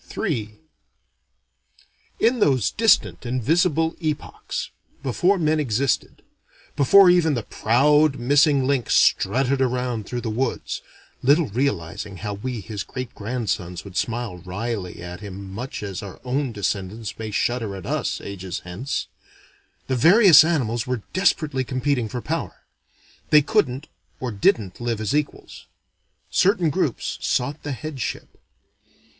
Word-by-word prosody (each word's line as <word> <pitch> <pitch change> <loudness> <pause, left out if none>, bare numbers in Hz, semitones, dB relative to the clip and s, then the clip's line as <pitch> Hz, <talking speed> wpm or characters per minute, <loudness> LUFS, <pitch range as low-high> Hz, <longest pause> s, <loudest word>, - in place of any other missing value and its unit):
III 110 - -2 1.6
In 240 +2 +3
those 130 - +2
distant 225 -2 +2
invisible 160 - +1
epochs 155 -3 -4 0.3
before 175 +9 +2
men 155 -2 +1
existed, 135 -1 -1 0.5
before 180 +7 +7
even 165 -4 +3
the 120 - -2
proud 145 +7 +3
missing 140 +2 +3
link 135 -4 0
strutted 135 +1 +3
around 125 -4 -1
through 120 -1 -3
the 115 - -3
woods 125 +3 -2 0.4
(little 145 +3 +3
realizing 100 - -2
how 105 +2 -4
we 115 +3 -5
his 100 0 -5
greatgrandsons 110 -7 -4
would 100 -3 -11
smile 115 -4 -2
wryly 95 0 -5
at 90 0 -7
him 100 -1 -8
much 125 +2 -6
as 100 -2 -5
our 100 -2 -9
own 130 +1 -1
descendants 100 +1 -4
may 110 -1 -4
shudder 115 -1 -1
at 95 - -8
us, - - -2
ages 95 -2 -6
hence) 95 +11 -4 0.8
the 130 - -1
various 170 - +8
animals 125 -9 0
were 125 -4 -2
desperately 155 -7 +1
competing 130 -2 -1
for 125 +2 -4
power. - - -4 0.7
They 150 -1 +6
couldn't 150 - 0 0.3
or 125 -2 -3
didn't 100 0 +1
live 120 -2 -1
as 110 +4 -2
equals. 150 -1 -4 0.6
Certain 185 -4 +3
groups 150 - -2
sought 140 +5 -1
the 145 - -5
headship. 145 -1 -6
125 Hz, 125 wpm, -23 LUFS, 105-150 Hz, 1.6 s, various